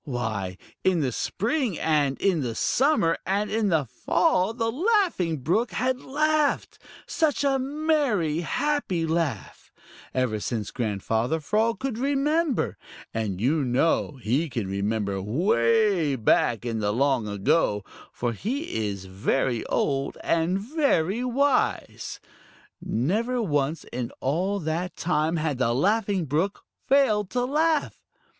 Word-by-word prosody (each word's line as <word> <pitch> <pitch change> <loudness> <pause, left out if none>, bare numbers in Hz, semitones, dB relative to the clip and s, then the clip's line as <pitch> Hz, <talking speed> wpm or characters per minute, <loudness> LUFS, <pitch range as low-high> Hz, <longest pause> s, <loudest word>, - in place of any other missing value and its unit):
Why, 110 - -3 0.3
in 180 -3 +3
the 130 -3 0
spring 230 - -1
and 145 -4 +1
in 185 -6 +2
the 120 -4 -3
summer 255 - +2
and 200 +3 -1
in 215 -1 +1
the 160 -5 +2
fall 185 - +1
the 225 -1 -1
Laughing 340 - +1
Brook 220 - 0
had 255 +1 0
laughed 305 +1 0 0.3
such 310 -3 0
a 270 -1 +2
merry, 270 - 0
happy 190 - -1
laugh 160 -2 -3 0.4
ever 125 -4 0
since 110 -1 -3
Grandfather 115 +5 -1
Frog 215 +8 +1
could 250 0 -3
remember, 285 +2 0 0.3
and 105 -5 -2
you 140 +7 +2
know 135 +3 +1
he 130 +8 0
can 115 -5 -3
remember 100 0 -1
way 145 - +2
back 115 0 +2
in 115 -2 -2
the 105 -1 0
long 130 -1 +1
ago, 105 +1 +1 0.3
for 120 -1 -2
he 220 - -3
is 100 -2 -5
very 110 +6 -1
old 135 -1 -1
and 165 +3 +1
very 235 - +1
wise. 265 +2 0 0.6
Never 215 - 0
once 150 -6 0
in 120 -1 -3
all 180 +9 0
that 165 +3 -2
time 160 -1 0
had 155 -5 -1
the 120 -2 +2
Laughing 200 - +1
Brook 160 +8 -1 0.2
failed 215 -8 +3
to 245 +2 0
laugh. 310 +3 0
165 Hz, 130 wpm, -25 LUFS, -, 0.6 s, in